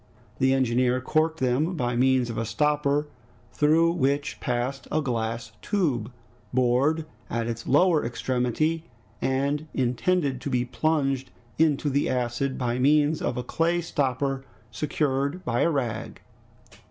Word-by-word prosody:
The 130 Hz, 0 st, +3 dB
engineer 125 Hz, -1 st, +2 dB
corked 155 Hz, +4 st, 0 dB
them 130 Hz, +8 st, +1 dB
by 125 Hz, -5 st, -1 dB
means 130 Hz, -1 st, +2 dB
of 115 Hz, -, -6 dB
a -, -, 0 dB
stopper 150 Hz, +3 st, +1 dB, 0.5 s
through 160 Hz, +3 st, +4 dB
which 140 Hz, -3 st, 0 dB
passed 125 Hz, +1 st, -2 dB
a 155 Hz, -, +2 dB
glass 115 Hz, -4 st, -2 dB
tube, 140 Hz, -, 0 dB, 0.4 s
bored 130 Hz, +6 st, +2 dB, 0.2 s
at 115 Hz, -1 st, -1 dB
its 115 Hz, -1 st, -5 dB
lower 155 Hz, +3 st, +4 dB
extremity, 130 Hz, +7 st, -1 dB, 0.4 s
and 140 Hz, +3 st, 0 dB
intended 135 Hz, +2 st, 0 dB
to 140 Hz, -, -4 dB
be 125 Hz, -2 st, +1 dB
plunged 135 Hz, -1 st, 0 dB, 0.3 s
into 155 Hz, -2 st, +3 dB
the 140 Hz, 0 st, +1 dB
acid 125 Hz, +1 st, -1 dB
by 125 Hz, -1 st, -1 dB
means 150 Hz, +3 st, +3 dB
of -, -, -1 dB
a 125 Hz, -, -2 dB
clay 170 Hz, +6 st, +1 dB
stopper 135 Hz, -4 st, -1 dB, 0.3 s
secured 145 Hz, +3 st, -1 dB
by 120 Hz, -3 st, 0 dB
a -, -, +4 dB
rag. 120 Hz, -8 st, -3 dB
135 Hz, 135 wpm, -26 LUFS, 125-155 Hz, 0.5 s, through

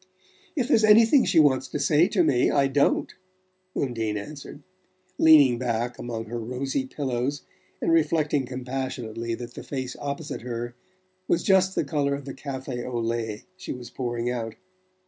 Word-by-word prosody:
"If 255 Hz, -5 st, 0 dB
there's 230 Hz, -6 st, +4 dB
anything 225 Hz, +5 st, +6 dB
she 165 Hz, -, +4 dB
wants 135 Hz, -3 st, +4 dB
to 150 Hz, -, -4 dB
say 150 Hz, +4 st, +4 dB
to 195 Hz, -4 st, +2 dB
me, 125 Hz, -6 st, +3 dB
I 140 Hz, -1 st, +3 dB
don't," 140 Hz, +1 st, +1 dB, 0.6 s
Undine 115 Hz, -5 st, -1 dB
answered, 145 Hz, +5 st, -9 dB, 0.6 s
leaning 145 Hz, -7 st, +7 dB
back 120 Hz, -1 st, -2 dB
among 115 Hz, -2 st, -4 dB
her 120 Hz, +2 st, -5 dB
rosy 130 Hz, +3 st, -3 dB
pillows, 135 Hz, 0 st, -2 dB, 0.4 s
and -, -, 0 dB
reflecting 150 Hz, -4 st, +2 dB
compassionately 125 Hz, -3 st, -4 dB
that 120 Hz, 0 st, -8 dB
the -, -, -8 dB
face 130 Hz, -2 st, -5 dB
opposite 145 Hz, +2 st, -4 dB
her 120 Hz, 0 st, -5 dB, 0.5 s
was 170 Hz, -, +1 dB
just 190 Hz, -1 st, +3 dB
the -, -, +1 dB
colour 140 Hz, -1 st, 0 dB
of 140 Hz, -1 st, -8 dB
the 135 Hz, -, -6 dB
café 130 Hz, -3 st, -5 dB
au 120 Hz, -1 st, -3 dB
lait 115 Hz, -2 st, -2 dB
she 185 Hz, -, -6 dB
was 125 Hz, -1 st, -9 dB
pouring 120 Hz, -1 st, -2 dB
out. 115 Hz, -2 st, -4 dB
130 Hz, 160 wpm, -25 LUFS, 120-150 Hz, 0.6 s, leaning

